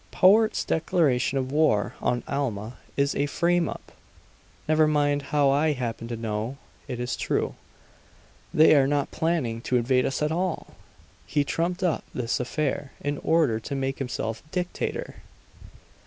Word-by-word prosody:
"Powart's 215 Hz, +4 st, +4 dB
declaration 155 Hz, -6 st, +1 dB
of 130 Hz, 0 st, -2 dB
war 145 Hz, -9 st, +2 dB
on 120 Hz, -1 st, 0 dB
Alma 120 Hz, -5 st, -3 dB, 0.2 s
is 140 Hz, 0 st, +2 dB
a 145 Hz, -, +1 dB
frame 170 Hz, +2 st, +1 dB
up! -, -, -9 dB, 0.8 s
Never 155 Hz, 0 st, +4 dB
mind 145 Hz, -1 st, +2 dB
how 145 Hz, -2 st, +3 dB
I 150 Hz, +2 st, +2 dB
happen 115 Hz, -3 st, -4 dB
to 120 Hz, -1 st, -4 dB
know; 110 Hz, +3 st, -3 dB, 0.3 s
it 125 Hz, -3 st, -5 dB
is 125 Hz, +1 st, -2 dB
true; -, -, -1 dB, 1.0 s
they 155 Hz, +1 st, +6 dB
are 135 Hz, -2 st, +5 dB
not 145 Hz, 0 st, 0 dB
planning 135 Hz, -9 st, -1 dB
to 125 Hz, -, +1 dB
invade 125 Hz, +2 st, +2 dB
us 135 Hz, -, -2 dB
at 150 Hz, -, +1 dB
all! 180 Hz, +1 st, -2 dB, 0.5 s
He 145 Hz, -1 st, +1 dB
trumped 175 Hz, +5 st, -2 dB
up 175 Hz, -4 st, +1 dB
this 120 Hz, -2 st, -1 dB
affair 140 Hz, +2 st, -2 dB
in 145 Hz, 0 st, -2 dB
order 150 Hz, -9 st, +2 dB
to 140 Hz, +5 st, -5 dB
make 135 Hz, 0 st, -2 dB
himself 115 Hz, -4 st, -3 dB
dictator!" 180 Hz, +1 st, -3 dB
140 Hz, 150 wpm, -26 LUFS, 125-155 Hz, 1.0 s, they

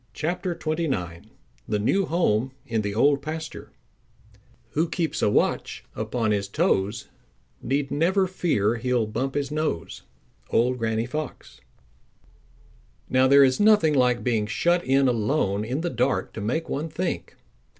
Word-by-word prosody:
CHAPTER 175 Hz, +2 st, -2 dB
XXIX 150 Hz, -, -3 dB, 0.4 s
The 105 Hz, -, 0 dB
New 185 Hz, -, +1 dB
Home 130 Hz, -7 st, +1 dB
In 115 Hz, -2 st, -1 dB
The 100 Hz, -1 st, -3 dB
Old 140 Hz, +4 st, +3 dB
Pasture 160 Hz, +1 st, -6 dB, 1.0 s
Who 160 Hz, +2 st, 0 dB
keeps 165 Hz, -2 st, -2 dB
a -, -, +3 dB
watch -, -, 0 dB
upon 110 Hz, 0 st, -1 dB
his 100 Hz, -1 st, 0 dB
toes 100 Hz, +3 st, 0 dB, 0.5 s
Need 140 Hz, +1 st, -1 dB
never 185 Hz, +6 st, +2 dB
fear 155 Hz, -, 0 dB
he'll 120 Hz, -1 st, 0 dB
bump 130 Hz, +6 st, -3 dB
his 140 Hz, -1 st, -1 dB
nose. 155 Hz, -, -3 dB, 0.5 s
—Old 125 Hz, +2 st, +2 dB
Granny 110 Hz, 0 st, 0 dB
Fox. 150 Hz, +5 st, -6 dB, 1.5 s
Now 130 Hz, 0 st, +4 dB
there 140 Hz, +1 st, +7 dB
is 130 Hz, -1 st, +3 dB
nothing 205 Hz, -7 st, +5 dB
like 125 Hz, -3 st, +2 dB
being 115 Hz, -4 st, 0 dB
shut 175 Hz, +11 st, +1 dB
in 135 Hz, +1 st, +3 dB
alone 110 Hz, -3 st, 0 dB
in 130 Hz, +7 st, -2 dB
the 175 Hz, -, -2 dB
dark 125 Hz, +2 st, 0 dB
to 110 Hz, -, -6 dB
make 130 Hz, +11 st, -2 dB
one 155 Hz, +4 st, -3 dB
think. 170 Hz, +3 st, -4 dB
130 Hz, 140 wpm, -25 LUFS, 110-160 Hz, 1.5 s, there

